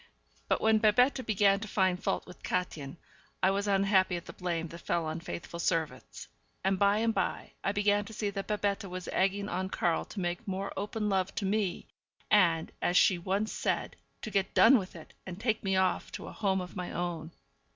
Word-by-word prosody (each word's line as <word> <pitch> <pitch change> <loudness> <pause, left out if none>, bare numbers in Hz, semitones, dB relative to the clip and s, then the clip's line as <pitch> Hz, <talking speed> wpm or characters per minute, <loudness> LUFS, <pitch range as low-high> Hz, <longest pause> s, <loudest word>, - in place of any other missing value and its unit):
But - - +1
when 220 0 +4
Babette 250 +5 +4
began 200 -2 +4
to 220 - -6
find 185 -3 +1
fault - - -1
with 180 - -13
Kätchen, 160 -5 -3 0.5
I 190 - +5
was 200 +1 -1
unhappy 195 -2 +3
at 170 - -6
the - - -9
blame 170 -2 -2
that 170 - -9
fell 170 -1 -1
on 155 +1 -3
faithful 170 0 -7
servants; 160 -6 -2 0.4
and 190 0 +1
by 200 +1 +4
and 225 +1 +1
by - - -2
I 195 - +1
began 205 0 +2
to 220 - -10
see 205 -1 -2
that 195 -1 -5
Babette 205 -1 -1
was 185 -1 -6
egging 195 +2 +1
on 185 0 -2
Karl 170 -3 0
to 210 - -8
make 175 +4 -3
more 195 +1 -3
open 210 +2 -2
love 190 -2 0
to 200 - -2
me, 195 -2 -1 0.5
and, 170 -6 +4
as 175 - +2
she 180 -3 +5
once 195 +5 -1
said, - - -1 0.3
to 215 - -5
get 195 -1 0
done 270 - +7
with 185 -2 -8
it, 160 - -12
and 180 0 -6
take 220 -1 0
me 195 -1 +1
off 190 -1 +1
to - - -6
a - - -7
home 190 -3 0
of 180 - -8
my 180 -1 -4
own. 170 -2 -3
195 Hz, 205 wpm, -30 LUFS, 175-205 Hz, 0.5 s, done